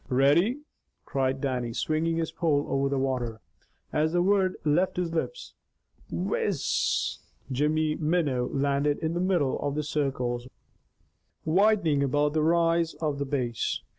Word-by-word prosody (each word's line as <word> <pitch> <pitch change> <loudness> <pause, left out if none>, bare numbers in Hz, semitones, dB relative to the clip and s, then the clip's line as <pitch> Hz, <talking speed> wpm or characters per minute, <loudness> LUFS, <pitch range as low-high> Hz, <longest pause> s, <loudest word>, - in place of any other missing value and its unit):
"Ready!" 160 - +3 0.4
cried 135 0 -1
Dannie, 125 -4 -2
swinging 165 +1 0
his 165 -1 -1
pole 155 -4 +1
over 135 0 0
the 140 - 0
water. 125 -4 -2 0.5
As 155 +2 +1
the 175 0 +3
word 190 -1 +2
left 170 +6 +2
his 175 -2 -1
lips, - - -3 0.6
"whizz," 470 -1 0 0.3
Jimmy's 150 +3 +1
minnow 150 -6 +1
landed 140 +1 +1
in 160 0 -2
the 175 - -1
middle 180 -8 +1
of 145 0 -2
the 150 - -1
circles 130 -5 -2 1.0
widening 170 -4 +3
about 145 +2 +1
the 155 - +1
rise 165 +1 +2
of 150 -3 -2
the 140 - -1
Bass. 125 -4 -2
150 Hz, 135 wpm, -27 LUFS, 135-170 Hz, 1.0 s, Ready